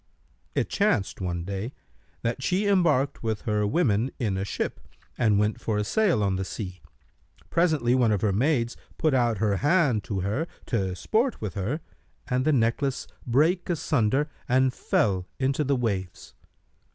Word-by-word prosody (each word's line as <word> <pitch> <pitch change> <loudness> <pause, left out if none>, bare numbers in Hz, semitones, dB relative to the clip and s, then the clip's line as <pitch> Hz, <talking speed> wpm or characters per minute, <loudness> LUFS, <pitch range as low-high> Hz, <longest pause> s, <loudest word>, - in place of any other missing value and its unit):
It - - +1
chanced, 145 - 0
one 85 -2 -2
day, 100 +6 -4 0.5
that 115 +3 -1
she 185 +8 +1
embarked 170 -9 +2
with 110 -2 -2
her 105 -1 0
women 115 - +2
in 110 -7 -1
a 95 - -1
ship 100 - -3 0.4
and 110 -4 +3
went 105 +1 0
for 110 -2 -1
a 105 - +1
sail 180 - +2
on 95 -2 +1
the 95 - -1
sea. 95 -3 -6 0.7
Presently, 155 -8 +2
one 125 -3 +3
of 100 -3 +1
her 105 -3 +2
maids 120 +1 +1 0.2
put 155 -3 +2
out 120 -4 +2
her 100 -1 +1
hand 145 - +2
to 100 -3 -2
her, 110 - -1 0.2
to 95 -7 -1
sport 230 - 0
with 105 -5 -4
her, 110 - -2 0.5
and 130 +1 0
the 155 - +4
necklace 130 +1 +1 0.2
brake 160 +10 +2
asunder 145 -4 +1 0.2
and 130 +1 +3
fell 95 -7 0
into 135 +3 +1
the 140 0 +1
waves. 100 -7 -3
120 Hz, 165 wpm, -26 LUFS, 105-145 Hz, 0.7 s, the